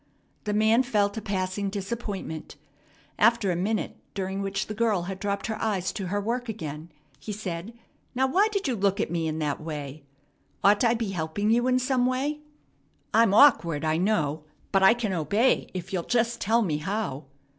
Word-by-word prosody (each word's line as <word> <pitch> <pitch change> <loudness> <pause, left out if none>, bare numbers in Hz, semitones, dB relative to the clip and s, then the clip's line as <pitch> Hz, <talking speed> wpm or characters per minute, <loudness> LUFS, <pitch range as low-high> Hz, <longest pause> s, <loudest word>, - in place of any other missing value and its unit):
The 210 - -1
man 220 +3 +4
felt 210 -6 +1
a - - -3
passing 195 0 -2
disappointment. 200 -6 -5 0.6
After 225 -3 +4
a - - 0
minute, 205 +5 -2 0.2
during 195 0 -2
which 195 0 -2
the 215 - -5
girl 215 -4 +1
had 190 +1 -5
dropped 200 0 -2
her 220 0 -4
eyes 195 -5 0
to 195 -3 -4
her 205 +3 -1
work 235 +4 -2
again, 160 -5 -6 0.3
he 215 - -6
said: 195 +1 -5 0.4
"Now, 260 +1 +3
why 380 +11 +3
did 400 -6 -1
you 255 - 0
look 200 -1 +1
at - - -1
me 165 -2 -1
in 155 0 -2
that 150 -2 -2
way? 150 -2 -6 0.6
Ought 205 +3 +5
I 235 -1 +4
to - - -1
be 225 -3 -2
helping 180 +5 -1
you 240 +2 +3
in 255 0 +3
some 255 -1 +1
way? 275 +4 -1 0.7
I'm 225 -2 +5
awkward, 170 - +5
I 155 0 +1
know, 160 -6 0 0.3
but 195 - +3
I 190 +4 +7
can 220 -5 -2
obey 200 - +1
if 185 +1 -6
you'll 180 - 0
just 235 +4 0
tell 225 +3 +3
me 155 -7 0
how." 165 -4 -3
200 Hz, 190 wpm, -26 LUFS, 175-230 Hz, 0.7 s, I